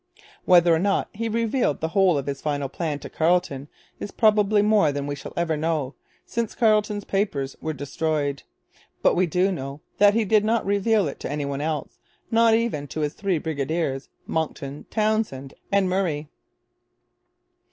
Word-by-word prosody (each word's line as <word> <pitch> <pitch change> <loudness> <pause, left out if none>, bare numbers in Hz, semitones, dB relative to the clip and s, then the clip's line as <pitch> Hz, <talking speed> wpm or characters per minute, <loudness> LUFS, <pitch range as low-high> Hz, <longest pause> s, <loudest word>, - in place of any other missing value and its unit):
Whether 175 -2 +6
or 160 - +3
not 195 +2 +1
he 225 +2 -3
revealed 230 - 0
the 160 - -2
whole 190 -3 +3
of 140 - -3
his 140 -1 -4
final 145 -2 -1
plan 150 +1 -3
to - - -7
Carleton 160 -4 0 0.3
is - - -5
probably 210 -1 +3
more 210 -7 +4
than 140 0 -3
we 145 - -3
shall 140 - -8
ever 170 -2 +1
know, 150 -3 -1 0.3
since 230 -2 -3
Carleton's 210 -2 +2
papers 195 -11 -1
were 160 - -2
destroyed. 145 0 -2 0.6
But - - +5
we 185 0 +2
do 180 +4 +1
know 140 -4 -5 0.2
that 205 0 +6
he 225 -1 +2
did 210 +1 +3
not 225 +1 +1
reveal 200 -1 +2
it 140 - -6
to - - -5
any 145 -1 -2
one 140 0 -3
else, 155 -2 -3 0.3
not 225 0 +5
even 225 -11 -1
to 155 - -5
his 150 0 -1
three 195 -4 -1
brigadiers, 145 -2 -2 0.2
Monckton, 150 -3 -4
Townshend, 215 - -1 0.2
and 200 -1 +3
Murray. 175 -5 -1
170 Hz, 170 wpm, -24 LUFS, 145-205 Hz, 0.6 s, Whether